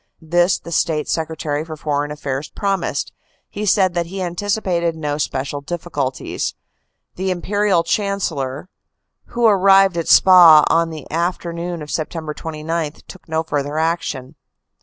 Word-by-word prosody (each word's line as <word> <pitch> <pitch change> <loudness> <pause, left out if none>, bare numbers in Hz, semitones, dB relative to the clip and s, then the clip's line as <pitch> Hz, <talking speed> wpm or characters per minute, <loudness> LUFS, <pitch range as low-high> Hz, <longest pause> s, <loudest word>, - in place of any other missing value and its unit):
This 175 +3 +2
the 170 - -11
State 155 -2 0
Secretary 155 -2 -2
for 160 -1 -8
Foreign 145 -1 -1
Affairs 145 -1 -4
promised; 195 -1 -2 0.4
he 210 +1 -4
said 190 -2 +3
that 170 -1 -1
he 190 +3 -6
anticipated 180 -2 -1
no 150 -2 -3
special 140 0 -3
difficulties. 145 -4 -3 0.6
The 190 +1 -1
Imperial 190 0 +1
Chancellor, 170 -7 -2 0.6
who 240 0 -1
had 220 - +7
arrived 195 -1 +5
at 165 - -3
Spa 170 -5 +8
on 165 0 +2
the 155 -3 -8
after 170 +1 -2
noon 170 -1 -4
of 150 - -10
Sept. 155 -1 -4
29, 160 -1 -3
took 185 - -13
no 160 0 0
further 145 -1 -3
action. 160 -5 -2
165 Hz, 140 wpm, -19 LUFS, 150-180 Hz, 0.6 s, Spa